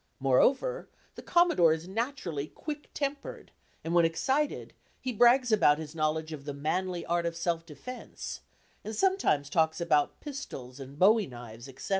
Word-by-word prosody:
Moreover, 265 - +2 0.2
the - - -10
Commodore 340 - +4
is 160 +2 -5
naturally 195 - -3
quick 295 - -7
tempered, 290 - -4 0.3
and 165 - -3
when 170 -1 +5
excited, 265 - 0 0.3
he 255 - -3
brags 240 +2 +5
about 150 -9 +5
his 155 -1 -7
knowledge 155 0 -1
of 140 -2 -8
"the 145 -1 -5
manly 175 +4 -2
art 170 0 0
of 170 - -4
self 170 -1 -1
defence," 215 - -8 0.4
and 220 +1 -5
sometimes 380 - +2
talks 160 +2 +1
about 150 -4 +1
pistols 145 - -8
and 135 +1 -10
bowie 205 +3 +5
knives, 120 0 -10
etc. 135 0 -9
170 Hz, 155 wpm, -29 LUFS, -, 0.4 s, when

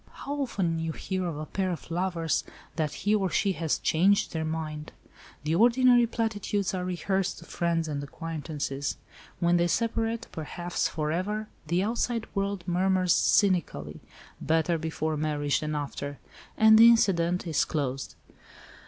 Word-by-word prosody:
"How 280 - -3
often 180 -10 -1
you 165 0 -2
hear 185 +1 -3
of 160 -4 -4
a 155 - -4
pair 190 +4 -2
of 170 -1 -6
lovers, 170 -2 0 0.3
that 155 -3 -1
he 205 - +3
or 195 -3 +2
she 200 +3 +1
has 165 -4 -1
'changed 195 +6 +2
their 160 -1 -1
mind.' 155 -1 -4 0.5
The 155 +1 0
ordinary 240 +4 +5
platitudes 210 -4 -1
are 185 -1 -2
rehearsed 185 +1 -1
to 165 - -12
friends 165 -2 -1
and 145 -2 -3
acquaintances. 150 -2 -4 0.4
When 175 0 +3
they 175 0 +2
separate—perhaps 225 -6 -2
for 155 -1 -2
ever—the 185 0 -2
outside 230 +1 -1
world 200 -2 -2
murmurs 185 0 +2
cynically, 125 - +1 0.4
'better 160 +2 +1
before 160 -1 -2
marriage 145 -1 0
than 155 0 -3
after,' 145 -1 -4 0.4
and 220 0 +7
the 230 +1 +10
incident 180 -6 +3
is 160 -4 +1
closed." 135 -4 -3
175 Hz, 145 wpm, -28 LUFS, 155-200 Hz, 0.5 s, the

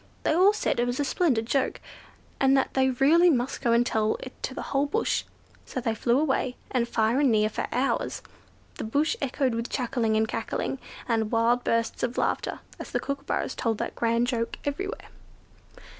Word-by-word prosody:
They - - +2
all 370 +5 +6
said 425 - -1
it 240 - +2
was 245 +2 -2
a 290 - +1
splendid 265 -8 +1
joke, 265 +3 0 0.6
and 270 0 +4
that 265 - 0
they 265 0 +3
really 295 +8 +5
must 255 -3 0
go 235 - +2
and 235 +1 +4
tell 220 -2 +1
it 255 - -8
to 260 - -4
the - - -4
whole 280 +1 +2
bush. 445 +10 0 0.4
So - - -5
they 230 -2 -1
flew 235 +3 +2
away, 265 -4 0 0.2
and 245 -3 +1
far 230 +2 +1
and 280 -4 +4
near, 215 -1 +3
for - - -3
hours, 260 +3 -1 0.6
the - - -2
bush 285 +8 +1
echoed 265 -2 0
with 230 +1 -3
chuckling 240 -4 0
and 220 0 +2
cackling, 225 +4 -3 0.3
and 225 -3 0
wild 235 +1 +2
bursts 230 0 0
of 245 0 -2
laughter, - - -1 0.2
as - - -7
the - - -1
kookooburras 280 0 -2
told 225 -2 -1
that - - -3
grand 230 0 +1
joke 230 -2 -2
everywhere. 390 - -4
250 Hz, 190 wpm, -27 LUFS, 230-275 Hz, 0.6 s, all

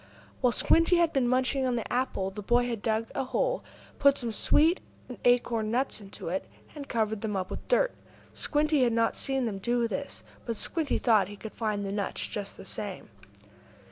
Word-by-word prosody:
While 250 -2 +4
Squinty 330 - +4
had 335 -1 +3
been 265 -3 +2
munching 260 +2 +1
on 250 - +1
the 230 - -3
apple, 240 -6 0
the 210 +2 -7
boy 240 +4 +3
had 230 -4 -3
dug 220 0 -1
a - - -1
hole, - - 0 0.4
put 280 0 +5
some 235 -2 -2
sweet 315 - +3 0.4
acorn 235 -3 +2
nuts 245 -1 -1
into 195 -4 -7
it, 190 +2 -2 0.3
and 285 -2 -8
covered 220 -3 0
them 215 -2 -2
up 185 -1 -3
with - - -6
dirt. - - +3 0.4
Squinty 300 -1 +1
had 240 -2 +3
not 230 0 +2
seen 270 -3 0
him 200 -3 -4
do 235 +3 +1
this, 280 +5 -5 0.2
but 230 -2 -3
Squinty 315 +4 -1
thought 215 -6 +3
he 205 - -9
could 220 +1 -8
find 210 -3 -2
the 195 - -3
nuts 200 -1 -2
just 200 -1 -6
the - - -10
same. 195 -1 -6
235 Hz, 195 wpm, -29 LUFS, 210-270 Hz, 0.4 s, put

